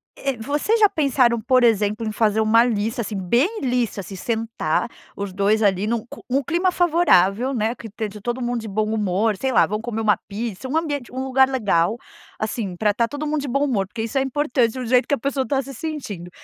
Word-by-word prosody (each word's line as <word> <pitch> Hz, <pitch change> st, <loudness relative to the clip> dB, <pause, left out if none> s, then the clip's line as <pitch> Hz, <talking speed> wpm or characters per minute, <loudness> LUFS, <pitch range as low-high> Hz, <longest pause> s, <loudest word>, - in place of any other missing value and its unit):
Eh, 275 Hz, -3 st, -3 dB
vocês 295 Hz, -, 0 dB
já 420 Hz, -, +7 dB
pensaram 255 Hz, -, +2 dB
por 255 Hz, +2 st, +3 dB
exemplo, 215 Hz, -1 st, +2 dB
em -, -, -1 dB
fazer 215 Hz, 0 st, +1 dB
uma 220 Hz, +1 st, +5 dB
lista, 225 Hz, +1 st, -1 dB
assim, 210 Hz, -2 st, -4 dB
bem 245 Hz, -, +1 dB
lista. 245 Hz, -6 st, -1 dB
Se 195 Hz, -, -9 dB
sentar 225 Hz, +3 st, -1 dB, 0.3 s
os 200 Hz, -2 st, -4 dB
2, 205 Hz, +3 st, +2 dB
ali, 200 Hz, 0 st, +2 dB
num 230 Hz, -1 st, -1 dB
cu -, -, -12 dB
um 270 Hz, +3 st, +1 dB
clima 350 Hz, +3 st, +1 dB
favorável, 270 Hz, -, +3 dB
né. 225 Hz, -1 st, 0 dB
Que 230 Hz, -2 st, -9 dB
te 220 Hz, +1 st, -4 dB
de 210 Hz, 0 st, -11 dB
todo 240 Hz, +3 st, -3 dB
mundo 240 Hz, -1 st, -1 dB
de 220 Hz, -, -7 dB
bom 215 Hz, +1 st, -1 dB
humor, 210 Hz, 0 st, +1 dB
sei 265 Hz, -, -1 dB
lá, 220 Hz, -, +5 dB
vão 210 Hz, +1 st, -3 dB
comer 225 Hz, -1 st, -3 dB
uma 215 Hz, -2 st, +3 dB
pizza, 220 Hz, +3 st, -5 dB
um 310 Hz, -, 0 dB
ambiente 290 Hz, -7 st, -3 dB
um 260 Hz, +1 st, -4 dB
lugar 265 Hz, 0 st, +3 dB
legal, 210 Hz, -5 st, +1 dB, 0.4 s
assim, 215 Hz, -3 st, -3 dB
pra 210 Hz, +3 st, +1 dB
tá 230 Hz, +2 st, +1 dB
todo 290 Hz, +3 st, -5 dB
mundo 300 Hz, 0 st, -1 dB
de 280 Hz, -, -5 dB
bom 275 Hz, +3 st, 0 dB
humor, 205 Hz, -9 st, 0 dB
porque 225 Hz, +2 st, -5 dB
isso 230 Hz, +4 st, -3 dB
é -, -, +1 dB
importante 260 Hz, -4 st, +1 dB
do 255 Hz, -2 st, -5 dB
jeito 250 Hz, +2 st, +3 dB
que 285 Hz, -, +2 dB
a -, -, -9 dB
pessoa 275 Hz, +1 st, -1 dB
está 270 Hz, 0 st, 0 dB
se 275 Hz, +1 st, -9 dB
sentindo. 225 Hz, -, -6 dB
235 Hz, 230 wpm, -22 LUFS, 210-270 Hz, 0.4 s, já